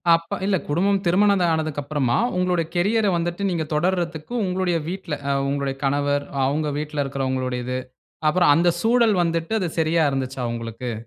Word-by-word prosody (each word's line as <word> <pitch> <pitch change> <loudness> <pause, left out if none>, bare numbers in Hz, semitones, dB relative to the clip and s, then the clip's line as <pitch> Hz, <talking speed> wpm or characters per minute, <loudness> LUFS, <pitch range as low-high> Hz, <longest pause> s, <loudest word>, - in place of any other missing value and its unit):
அப்ப 165 0 -4
இல்ல 195 -1 +2
குடும்பம் 190 +6 +1
திருமணம் 195 +1 +3
ஆனதுக்கு 155 -2 -2
அப்புறமா 140 -4 0 0.2
உங்களுடைய 180 -2 +1
கேரியர் 210 +5 +2
ஐ - - +1
வந்துட்டு 175 +3 -2
நீங்க 170 -3 -1
தொடர்தற்கு 170 +2 -1
உங்களுடைய 180 -2 0
வீட்டில, 185 -3 -5 0.3
உங்களுடைய 140 -1 -1
கணவர், 145 +1 +1 0.2
அவங்க 150 +3 0
வீட்டில 150 -1 -2
இருக்கிறவங்களுடையது. 130 -2 -2 0.5
அப்புறம் 175 0 +4
அந்த 170 +1 +3
சூழல் 230 -2 +3
வந்துட்டு 165 +4 -1
அது 180 - -1
சரியா 160 0 +2
இருந்துச்சா 130 -1 -3
உங்களுக்கு? 115 +1 -5
160 Hz, 145 wpm, -23 LUFS, 140-180 Hz, 0.5 s, அப்புறம்